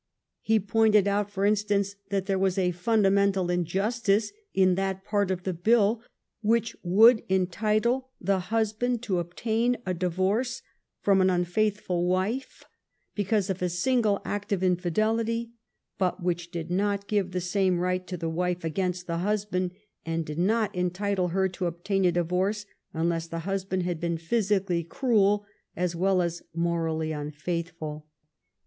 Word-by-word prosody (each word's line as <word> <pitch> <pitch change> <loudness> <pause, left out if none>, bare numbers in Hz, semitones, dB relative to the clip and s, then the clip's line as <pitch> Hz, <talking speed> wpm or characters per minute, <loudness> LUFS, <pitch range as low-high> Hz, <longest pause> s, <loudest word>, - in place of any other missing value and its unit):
He 220 0 +3
pointed 210 0 +3
out, 205 0 +1
for 200 -1 -1
instance, 205 -1 +1
that 195 -1 -1
there 195 -1 0
was 190 0 +1
a 180 -2 +2
fundamental 195 -1 +2
injustice 200 +5 +1 0.2
in 185 -1 +4
that 190 +1 -2
part 205 -2 +1
of 185 -1 -2
the 185 - -1
bill 215 +5 +3 0.4
which 230 +1 +1
would 220 +6 +6
entitle 215 +7 +1
the 195 +1 +1
husband 225 +2 0
to 190 -7 0
obtain 225 +8 0
a 185 - -1
divorce 190 +9 -1 0.4
from 195 -1 +4
an 185 - +4
unfaithful 180 0 0
wife 190 +9 -1 0.5
because 205 -1 0
of 190 - -5
a 180 - +1
single 205 +3 +1
act 205 0 -4
of 190 -2 0
infidelity, 220 +6 0 0.5
but 185 0 0
which 175 -1 -1
did 170 0 -5
not 200 +2 0
give 205 -3 0
the 180 0 -2
same 185 0 +1
right 180 +1 -1
to 180 - -4
the 165 - -3
wife 180 +2 -1
against 180 +2 -2
the 170 -1 -2
husband, 195 -2 0 0.3
and 165 0 -2
did 150 +2 -5
not 215 +3 +1
entitle 180 +1 0
her 190 +2 +1
to 180 -1 -3
obtain 190 +3 -1
a 180 - +5
divorce 180 +5 0 0.3
unless 165 0 -1
the 165 0 -4
husband 190 -1 -1
had 175 -2 -2
been 170 0 -1
physically 190 -1 0
cruel 205 - +2 0.3
as 180 -1 -1
well 185 +1 +2
as 170 0 -3
morally 165 -2 -1
unfaithful. 155 +1 -4
190 Hz, 150 wpm, -27 LUFS, 175-210 Hz, 0.5 s, would